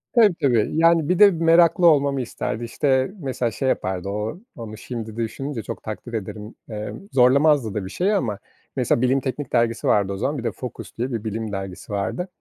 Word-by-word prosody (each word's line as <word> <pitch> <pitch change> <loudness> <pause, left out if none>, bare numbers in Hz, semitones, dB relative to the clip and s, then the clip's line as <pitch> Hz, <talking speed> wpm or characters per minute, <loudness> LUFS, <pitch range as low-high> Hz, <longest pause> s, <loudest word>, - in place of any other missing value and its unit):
Tabii, 215 -7 +6
tabii, 120 -6 +2
yani 165 -1 +3
bir 180 - +2
de 205 -1 +8
meraklı 170 +1 +4
olmamı 140 -3 +3
isterdi. 115 -1 -4
İşte, 130 +5 +1
mesela 130 -5 -2
şey 130 +4 -1
yapardı 95 +1 -2
o, 105 - -3 0.2
onu 110 -1 -8
şimdi 115 -3 -6
düşününce 115 +2 -4
çok - - -7
takdir 110 +2 -7
ederim. 105 0 -6
Eee, 105 -1 -5 0.2
zorlamazdı 135 -2 +4
da 100 -3 -3
bir - - -6
şeyi 190 - 0
ama 110 - -1 0.4
mesela - - +1
Bilim 130 +2 +3
Teknik 135 +1 -5
dergisi 115 -1 +1
vardı 100 -1 +2
o 95 - -5
zaman, 140 +7 -1
bir 120 - -5
de 115 - -1
Focus 125 +3 -9
diye 125 +3 -2
bir 115 -2 -3
bilim 110 0 -4
dergisi 95 0 -6
vardı. 105 - -2
120 Hz, 195 wpm, -22 LUFS, 110-145 Hz, 0.4 s, de